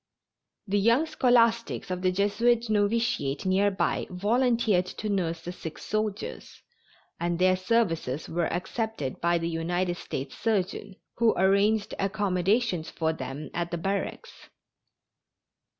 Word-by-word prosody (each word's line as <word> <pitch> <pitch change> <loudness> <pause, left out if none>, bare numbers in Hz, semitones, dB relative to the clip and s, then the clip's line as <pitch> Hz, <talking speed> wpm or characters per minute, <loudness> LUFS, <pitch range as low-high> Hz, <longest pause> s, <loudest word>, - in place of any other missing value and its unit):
The 205 0 +1
young 230 +9 +4
scholastics 235 - +2
of 180 0 -2
the 185 0 +2
Jesuit 220 +4 +1
Novitiate 205 -10 0
near 190 +2 +3
by 190 - -1
volunteered 215 -1 +2
to 215 - -5
nurse 170 -5 -1
the 175 - -5
sick 165 -3 -8
soldiers, 215 0 -4 0.6
and 170 0 -1
their 185 +1 +4
services 185 - 0
were 170 0 -1
accepted 220 - -3
by 170 0 +3
the 165 0 -2
United 175 +2 -1
States 135 -5 -5
surgeon, 200 -2 -1 0.2
who 230 -1 +3
arranged 200 +3 +3
accommodations 195 -1 0
for 160 -1 -1
them 135 0 -6
at 170 0 -2
the 170 - -3
barracks. 195 +4 -4
195 Hz, 125 wpm, -27 LUFS, 175-220 Hz, 0.6 s, young